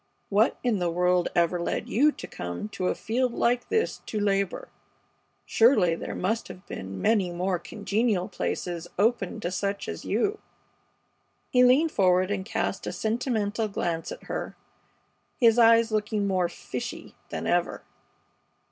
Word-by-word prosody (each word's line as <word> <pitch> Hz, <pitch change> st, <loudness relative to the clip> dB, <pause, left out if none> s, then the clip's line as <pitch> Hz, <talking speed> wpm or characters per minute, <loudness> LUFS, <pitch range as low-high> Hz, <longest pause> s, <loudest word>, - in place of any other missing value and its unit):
What 210 Hz, +4 st, +3 dB
in 235 Hz, -5 st, +1 dB
the 175 Hz, -1 st, 0 dB
world 180 Hz, +1 st, +2 dB
ever 175 Hz, 0 st, +2 dB
led -, -, -2 dB
you 290 Hz, +7 st, +4 dB
to -, -, -9 dB
come 90 Hz, -, -6 dB
to 185 Hz, -3 st, -3 dB
a -, -, 0 dB
field 245 Hz, +2 st, -1 dB
like 245 Hz, +1 st, +1 dB
this 445 Hz, +1 st, 0 dB
to 215 Hz, -, -2 dB
labor? 200 Hz, -2 st, 0 dB, 0.8 s
Surely 225 Hz, -8 st, +4 dB
there 165 Hz, -, -5 dB
must 220 Hz, +5 st, -1 dB
have 185 Hz, -, -11 dB
been 95 Hz, 0 st, -7 dB
many 210 Hz, -5 st, +2 dB
more 180 Hz, +1 st, -1 dB
congenial 205 Hz, 0 st, -1 dB
places 175 Hz, -3 st, -3 dB
open 210 Hz, -2 st, +1 dB
to 175 Hz, -, -2 dB
such 200 Hz, +2 st, -2 dB
as -, -, -5 dB
you." 415 Hz, 0 st, 0 dB, 1.1 s
He 250 Hz, -2 st, +5 dB
leaned 275 Hz, +6 st, +5 dB
forward 185 Hz, 0 st, +3 dB
and 195 Hz, -2 st, -1 dB
cast 195 Hz, -, -2 dB
a -, -, -1 dB
sentimental 220 Hz, -2 st, -1 dB
glance 170 Hz, -5 st, -3 dB
at -, -, -8 dB
her, -, -, -5 dB, 0.8 s
his 235 Hz, -2 st, +5 dB
eyes 230 Hz, 0 st, +6 dB
looking 210 Hz, -1 st, 0 dB
more 185 Hz, -3 st, +1 dB
"fishy" 125 Hz, -7 st, -7 dB, 0.2 s
than -, -, -4 dB
ever. -, -, 0 dB
205 Hz, 150 wpm, -27 LUFS, 180-230 Hz, 1.1 s, eyes